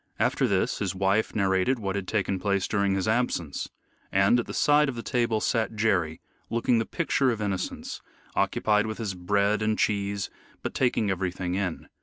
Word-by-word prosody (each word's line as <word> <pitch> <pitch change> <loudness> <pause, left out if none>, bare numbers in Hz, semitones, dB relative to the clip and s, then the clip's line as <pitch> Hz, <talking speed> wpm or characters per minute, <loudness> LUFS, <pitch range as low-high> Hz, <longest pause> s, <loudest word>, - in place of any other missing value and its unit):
After - - +2
this - - 0
his 95 -1 -2
wife 95 +3 +1
narrated 95 +5 +2
what 100 -3 -3
had 100 -2 -3
taken 100 -3 0
place 100 0 0
during 100 -2 +1
his 95 +1 -1
absence. 110 - -1 0.4
And 95 +5 +4
at 120 - -3
the - - -5
side 150 0 +4
of 130 - -4
the 115 - -5
table 115 -3 +1
sat 110 0 0
Jerry, 95 -8 +1 0.3
looking 115 +1 +2
the 115 - -2
picture 140 -5 +1
of 115 -3 -1
innocence, 100 -3 -3 0.3
occupied 105 0 +2
with 110 - -4
his 105 -4 -3
bread 100 +3 +1
and 110 0 +1
cheese, 100 -2 0 0.3
but - - -3
taking 120 -5 +1
everything 90 -1 -2
in. 95 -3 -2
100 Hz, 180 wpm, -27 LUFS, 95-115 Hz, 0.4 s, And